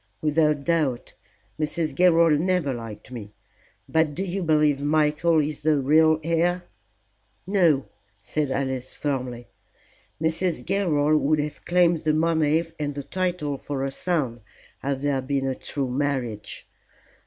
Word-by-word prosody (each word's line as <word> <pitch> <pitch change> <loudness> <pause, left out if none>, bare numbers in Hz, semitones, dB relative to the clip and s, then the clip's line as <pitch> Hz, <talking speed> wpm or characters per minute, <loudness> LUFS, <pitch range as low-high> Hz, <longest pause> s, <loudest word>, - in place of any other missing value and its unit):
"Without 150 0 +2
doubt. 150 -7 0 0.5
Mrs. 155 0 -1
Gilroy 170 +1 +5
never 170 -3 +1
liked 115 -1 -8
me. 105 -4 -8 0.5
But 160 -2 +1
do 190 - -2
you 195 +1 -3
believe 150 -4 +2
Michael 155 +2 +2
is 150 +1 -4
the 155 0 +3
real 155 +3 +4
heir?" 170 +2 +1 0.8
"No," 175 -8 +3 0.3
said 135 +7 -2
Alice, 130 -1 -3
firmly. 125 -4 -3 0.7
"Mrs. 160 -3 -1
Gilroy 155 -6 +2
would 155 +1 +2
have 150 0 -4
claimed 175 -2 +3
the 155 -1 +2
money 160 0 +2 0.2
and 145 -1 -2
the 140 - -4
title 160 -3 -2
for 140 -2 -4
her 135 - -2
son 135 -8 -2 0.4
had 135 0 -3
there 140 -2 +1
been 135 +1 -1
a 135 - 0
true 135 0 -3
marriage. 130 -6 -3
150 Hz, 135 wpm, -24 LUFS, 135-165 Hz, 0.8 s, Gilroy